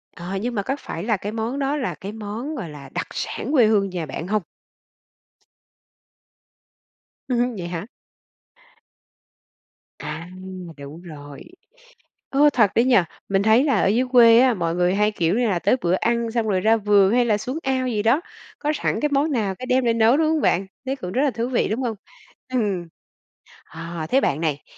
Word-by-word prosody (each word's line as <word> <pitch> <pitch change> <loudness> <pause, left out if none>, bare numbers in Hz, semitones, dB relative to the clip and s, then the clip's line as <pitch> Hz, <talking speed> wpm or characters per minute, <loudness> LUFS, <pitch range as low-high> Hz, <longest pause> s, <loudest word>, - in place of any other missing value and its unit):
Ờ, 175 +3 -6
nhưng 240 +2 -3
mà 205 - 0
có 265 +7 -2
phải 165 - -6
là 215 -2 +1
cái 205 +3 -5
món 230 +5 -3
đó 275 +1 0
là 260 - -3
cái 200 0 -7
món 220 +7 -6
gọi 210 - -5
là 140 -3 -11
đặc - - -4
sản 265 - -4
quê 250 -7 +5
hương 200 -3 +2
nhà 175 -3 -4
bạn 155 +4 -6
hông? 210 +2 0 2.9
Ừ 250 - 0
hứ, 240 +1 +2
vậy 175 -1 -5
hả? 175 +2 -5 2.1
À, 165 +3 -7 0.5
đúng 145 +4 -10
rồi. 145 -4 -11 0.9
Ô, 290 +2 +5
thật 220 -8 +3
đấy 235 - +4
nhỉ! 255 -2 +4 0.3
Mình 195 0 +2
thấy 220 +5 +4
là 285 - +2
ở - - +2
dưới 230 +6 +2
quê 235 -1 +8
á 255 -2 +4
mọi 170 -3 -1
người 180 +1 +2
hay, 210 +1 +2
kiểu, 175 -3 0
như 240 -2 +2
là 185 - +1
tới 205 +8 +2
bữa 175 -3 +1
ăn, 235 +3 0
xong 225 -1 -1
rồi 190 -2 +1
ra 225 +2 +4
vườn 205 -1 +3
hay 245 0 +3
là 210 -3 +1
xuống 255 +7 -4
ao 260 -1 0
gì 215 -3 -1
đó. 230 +9 +3 0.4
Có 300 0 -1
sẵn - - -1
cái 295 - +1
món 285 +2 +1
nào 205 -6 0
cái 255 - -8
đem 255 0 +2
ra 235 - +3
nấu, 230 +2 +4
đúng 315 +1 +2
không 315 -1 +1
bạn? 190 +2 +1 0.2
Thế 265 - -1
cũng 180 -7 -6
rất 260 - +1
là 290 - +3
thú 235 0 -3
vị 250 - +1
đúng 230 +5 -2
không? 230 -4 -2 0.6
Ừm. 200 -8 -1 0.8
À 165 0 -7
thế 270 +2 +3
bạn 140 +3 0
này, 150 -3 -1
220 Hz, 200 wpm, -22 LUFS, 180-250 Hz, 2.9 s, quê